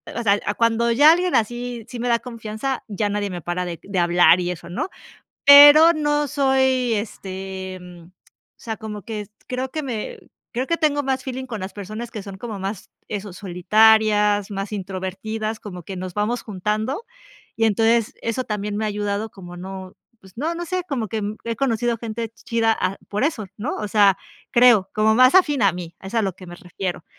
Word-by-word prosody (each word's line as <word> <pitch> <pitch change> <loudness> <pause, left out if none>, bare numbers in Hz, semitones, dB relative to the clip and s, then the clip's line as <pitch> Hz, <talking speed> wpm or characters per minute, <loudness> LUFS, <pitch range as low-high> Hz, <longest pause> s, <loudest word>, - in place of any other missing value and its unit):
o 235 - -2
sea, 200 -1 +3
a 205 - 0
cuando 230 +1 +2
ya 290 +7 +7
alguien 355 +1 +1
así, 240 +1 -2
sí 245 - -7
me 245 - -2
da 235 -1 +3
confianza, 230 +2 -5
ya 205 0 -2
nadie 205 0 -2
me 175 -1 -6
para 175 +2 -3
de 170 -2 -6
de 195 -2 -2
hablar 175 +1 +5
y 180 0 -1
eso, 175 - -8
¿no? 180 - -3 0.6
Pero 290 +3 +10
no 295 -1 0
soy, 265 -3 +2
este, 190 -2 -5
em 180 -2 -12
o 185 +1 -31
sea, 225 -2 -5
como 215 -2 -7
que 210 -1 -6 0.2
creo 255 +1 -3
que 310 -1 -3
me, 235 -6 -5 0.3
creo 255 +2 -2
que 335 - +1
tengo 290 -3 +1
más 265 -1 -1
feeling 260 0 -4
con 225 -4 -5
las 190 - -6
personas 215 +4 -7
que 215 -5 -6
son 195 -1 -9
como 220 -2 -6
más 195 +1 -5 0.2
eso, 205 -2 -5
solitarias, 210 +2 +3
más 195 +1 -4
introvertidas, 205 +3 -4
como 180 -4 -9
que 190 +4 -7
nos 180 0 -6
vamos 210 +5 -1
juntando, 215 - -2 0.5
Y 225 - +3
entonces 225 +1 +2
eso 230 +3 -2
también 210 -1 -3
me 220 - -1
ha - - 0
ayudado 205 +1 -2
como 175 -2 -11
no, 190 0 -8 0.3
pues, 190 -1 -17
no, 315 +5 -1
no 345 - -4
sé, 365 +1 -2
como 245 -6 -2
que 220 +2 -3 0.2
he 230 -1 -2
conocido 240 -2 0
gente 230 0 -4
chida 230 -1 0
a, 185 +1 -1
por 210 +5 -2
eso, 265 -9 -1
¿no? 240 +8 -3
O 210 - -3
sea, 200 -2 +4 0.3
creo, 235 -6 +5
como 215 +1 +3
más 255 +6 +6
afín 295 -9 +4
a 200 - +5
mí, 175 -1 -8
es 190 +2 -9
a 230 - +2
lo 195 -3 -1
que 185 - -12
me 175 - -9
refiero. 180 -2 -5
215 Hz, 200 wpm, -22 LUFS, 195-245 Hz, 0.6 s, Pero